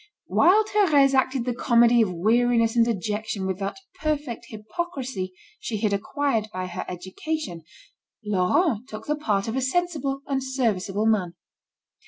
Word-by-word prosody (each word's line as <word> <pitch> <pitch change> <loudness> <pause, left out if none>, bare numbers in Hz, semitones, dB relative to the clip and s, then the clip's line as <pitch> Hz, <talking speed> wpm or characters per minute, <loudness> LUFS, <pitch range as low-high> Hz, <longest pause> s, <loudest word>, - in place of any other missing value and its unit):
While 400 +5 +5
Thérèse 305 -11 +4
acted 260 -2 +1
the 250 - 0
comedy 235 -1 +4
of 210 -4 +1
weariness 230 +5 +2
and 235 - +5
dejection 210 -2 -2
with 190 0 -2
that 195 0 -3 0.2
perfect 295 -7 -2
hypocrisy 220 - -4 0.3
she 220 - -3
had 210 -1 +1
acquired 225 +2 -1
by 185 -2 -4
her 180 - -5
education, 185 - -5 0.6
Laurent 210 - +1
took 215 +1 -8
the 300 - 0
part 210 -10 -1
of 225 - -2
a 265 - 0
sensible 280 -2 -1
and 270 -1 -1
serviceable 215 -6 -1
man. 190 -6 +1
235 Hz, 145 wpm, -25 LUFS, 205-275 Hz, 0.6 s, While